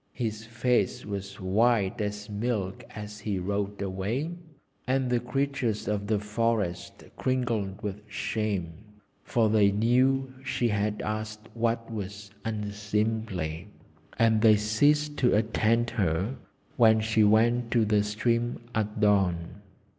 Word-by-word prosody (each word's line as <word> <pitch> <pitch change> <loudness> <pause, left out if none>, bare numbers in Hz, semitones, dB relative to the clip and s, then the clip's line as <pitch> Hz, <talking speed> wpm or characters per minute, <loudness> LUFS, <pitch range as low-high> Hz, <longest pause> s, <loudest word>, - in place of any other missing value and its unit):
His 110 -3 -3
face 115 -2 0
was 100 -1 -6
white 105 +2 +2
as 105 0 -3
milk 105 -3 -2
as 105 -1 -7
he 105 -2 -2
rode 100 +2 -2
away, 100 - -2 0.6
and 130 -1 +1
the 120 - +3
creatures 130 -3 -1
of 100 -1 -1
the 110 0 +2
forest 105 -3 -2
cringed 115 -6 -1
with 105 0 -4
shame. 100 -5 -3 0.4
For 115 -2 +2
they 105 -2 +4
knew 130 +5 +2
she 120 -2 0
had 105 0 -1
asked 110 +1 -4
what 115 0 -1
was 100 -1 -6
unseemly; 105 -5 -2 0.5
and 110 -1 +4
they 110 -1 +7
ceased 145 +8 +2
to 125 -5 +3
attend 115 +2 +2
her 95 +4 0 0.4
when 110 -3 +6
she 110 0 +2
went 115 +3 +3
to 115 -2 +3
the 105 -1 +3
stream 115 +3 0
at 105 0 -2
dawn. 95 -3 +1
110 Hz, 125 wpm, -28 LUFS, 100-115 Hz, 0.6 s, they